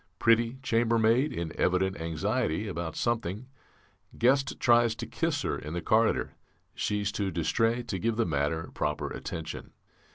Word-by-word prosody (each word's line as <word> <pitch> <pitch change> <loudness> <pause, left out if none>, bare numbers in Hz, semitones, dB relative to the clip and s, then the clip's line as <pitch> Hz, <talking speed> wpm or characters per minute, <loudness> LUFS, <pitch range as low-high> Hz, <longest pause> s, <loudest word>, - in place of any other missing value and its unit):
Pretty 115 +2 +3
chambermaid 115 +3 +3
in 85 -2 -4
evident 95 0 +1
anxiety 80 +3 -1
about 85 -4 -4
something; 115 -2 -1 0.7
guest 135 +3 +2
tries 120 -1 +4
to - - -5
kiss - - -1
her - - -1
in 75 +2 -7
the - - -1
corridor; 110 0 +2 0.4
she's 105 -1 -1
too 100 -1 -1
distrait 115 +8 0
to 95 - -2
give 115 +5 0
the 115 0 +1
matter 80 +1 -1
proper 75 0 -2
attention. 80 -1 -6
110 Hz, 140 wpm, -29 LUFS, 85-115 Hz, 0.7 s, tries